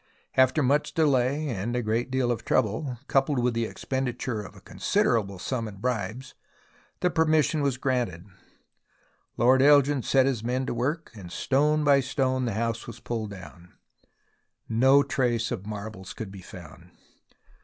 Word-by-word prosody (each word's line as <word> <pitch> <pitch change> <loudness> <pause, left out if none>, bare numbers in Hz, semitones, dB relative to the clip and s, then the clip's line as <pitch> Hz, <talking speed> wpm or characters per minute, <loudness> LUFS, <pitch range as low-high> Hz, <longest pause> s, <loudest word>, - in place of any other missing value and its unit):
After 130 +3 +4
much 145 +3 +1
delay 145 -1 +2
and 115 +1 -3
a 125 - -1
great 115 +3 -1
deal 130 -2 0
of 120 - -3
trouble, 125 +3 0
coupled 135 +1 +2
with 125 0 +1
the 115 -1 -1
ex - - -11
penditure 125 -4 -2
of - - -12
a - - -13
considerable 100 -4 0
sum 115 +4 -3
in 105 - -9
bribes, 120 +3 -3 0.7
the 180 - +2
per 160 0 +3
mission 155 -1 +2
was 140 -3 0
granted. 120 -11 -1 1.1
Lord 130 +3 +4
Elgin 145 -1 +5
set 130 +2 +3
his 130 -5 -1
men 125 +2 -1
to - - -2
work, 145 +8 -2
and 95 -6 -10
stone 150 +7 +1
by 140 -1 +5
stone 130 -1 0
the 115 - -2
house 115 +1 -2
was 115 -1 -9
pulled 115 -2 -4
down. 90 -2 -12 0.9
No 130 +5 +5
trace 120 -4 0
of 95 - -5
marbles 100 -3 -7
could 105 -4 -6
be 95 -1 -10
found. 90 -4 -12
125 Hz, 165 wpm, -26 LUFS, 110-135 Hz, 1.1 s, Elgin